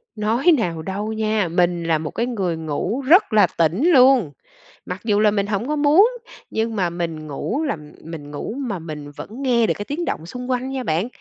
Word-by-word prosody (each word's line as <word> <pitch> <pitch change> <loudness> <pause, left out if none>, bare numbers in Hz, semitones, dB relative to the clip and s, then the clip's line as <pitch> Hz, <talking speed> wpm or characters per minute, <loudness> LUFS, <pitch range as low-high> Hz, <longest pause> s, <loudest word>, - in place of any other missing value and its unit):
Nói 230 +10 +2
nào 170 -8 -2
đâu 205 +5 -4
nha, 215 -3 0
mình 175 0 +1
là 165 -1 +2
một 155 0 -5
cái 235 - -1
người 195 -9 -2
ngủ 160 - -2
rất 345 - +5
là 210 -1 +6
tỉnh 170 - +2
luôn, 255 - +5 0.5
mặc 180 +1 -6
dù 210 -2 +2
là 210 -1 +4
mình 200 -1 0
hổng 210 +3 -2
có 300 - 0
muốn, 300 +9 +5 0.4
nhưng 225 0 -2
mà 185 -4 +1
mình 165 -3 -4
ngủ 155 - -3
là 285 - -1 0.3
mình 155 -3 -8
ngủ 145 - -5
mà 240 -10 -3
mình 150 -3 -8
vẫn 145 - -9
nghe 235 -3 +3
được - - +2
cái 205 - -5
tiếng 315 +7 -3
động 160 - -3
xung 250 +8 -7
quanh 255 +1 -1
nha 265 -1 -3
bạn, 170 +2 0
210 Hz, 215 wpm, -21 LUFS, 170-250 Hz, 0.5 s, là